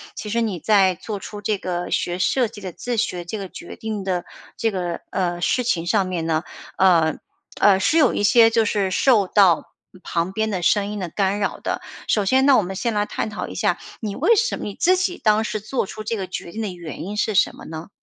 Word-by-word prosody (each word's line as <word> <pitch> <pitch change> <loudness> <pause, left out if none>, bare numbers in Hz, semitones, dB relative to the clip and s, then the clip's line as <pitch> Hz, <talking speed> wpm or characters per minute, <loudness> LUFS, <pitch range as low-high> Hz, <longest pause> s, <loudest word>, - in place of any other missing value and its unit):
其 210 - -6
实 235 +2 0
你 205 -7 -2
在 195 -2 +4
做 205 +3 -6
出 205 +2 -8
这 210 0 0
个 175 -2 -4
学 175 0 0
设 240 +6 +2
计 210 -1 -12
的 185 -2 -5
自 245 +8 -4
学 180 -5 -1
这 210 +5 -4
个 195 -2 -6
决 175 - -10
定 215 -3 -4
的 180 -2 -2 0.3
这 225 - 0
个， 175 -3 -3
呃， 175 -2 -1
事 250 +7 +1
情 170 -8 0
上 195 +1 +2
面 175 -3 -3
呢， 160 0 0 0.3
呃 170 -4 +4 0.4
呃， 195 -2 +5
是 315 +11 +2
有 290 -6 +5
一 - - -1
些 225 +2 +6
就 230 0 +2
是 200 -2 0
受 215 -1 +3
到 185 -5 +3 0.3
旁 170 +2 -1
边 220 +2 -1
的 190 -4 -2
声 200 +3 +2
音 210 0 -4
的 180 -3 -4
干 195 +2 0
扰 200 - -2
的。 - - -3 0.3
首 210 - +2
先 260 +6 +3
呢， 275 -2 +6
我 - - +4
们 190 0 -5
先 230 +4 -1
来 205 0 +1
探 215 - -3
讨 215 - -5
一 - - -8
下 - - +1 0.2
你 210 -3 -4
为 465 - +4
什 460 +3 +1
么 - - -7
你 205 - -4
自 365 - +3
己 365 -1 -1
当 215 0 +3
时 215 -1 -3
做 230 +4 -2
出 215 - -8
这 225 +2 -2
个 195 - -3
决 180 -1 -6
定 225 - -5
的 215 - -2
原 170 -3 -8
因 205 +4 -5
是 215 0 0
什 - - +3
么 - - -12
呢？ 160 +2 -8
205 Hz, 265 characters per minute, -22 LUFS, 180-220 Hz, 0.4 s, 些